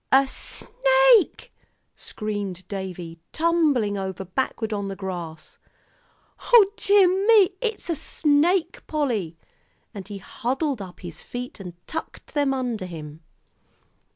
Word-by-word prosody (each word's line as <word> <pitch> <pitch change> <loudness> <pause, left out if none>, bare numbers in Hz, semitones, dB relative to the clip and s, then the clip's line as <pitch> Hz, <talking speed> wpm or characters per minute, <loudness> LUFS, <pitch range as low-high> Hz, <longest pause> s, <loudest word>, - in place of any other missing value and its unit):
"A 270 +1 +5
snake!" - - +3 0.4
screamed 200 -4 -5
Davie, 180 -4 -6
tumbling 300 -11 +1
over 190 0 -5
backward 220 +2 -2
on 200 -1 -3
the 195 - -5
grass. 175 -5 -7 0.9
"O 425 -5 +7
dear 405 -3 +5 0.2
me, 425 -4 +6
it's 450 -3 -2
a 340 - 0
snake, 325 +4 +2
Polly!" 230 - -2 0.6
and 195 -2 -8
he 205 -1 -7
huddled 260 - -3
up 185 -2 -10
his 170 -3 -9
feet 245 -1 -7
and 180 -3 -8
tucked 320 - -7
them 285 -2 +1
under 245 -7 -2
him. 155 -2 -9
235 Hz, 120 wpm, -24 LUFS, -, 0.9 s, O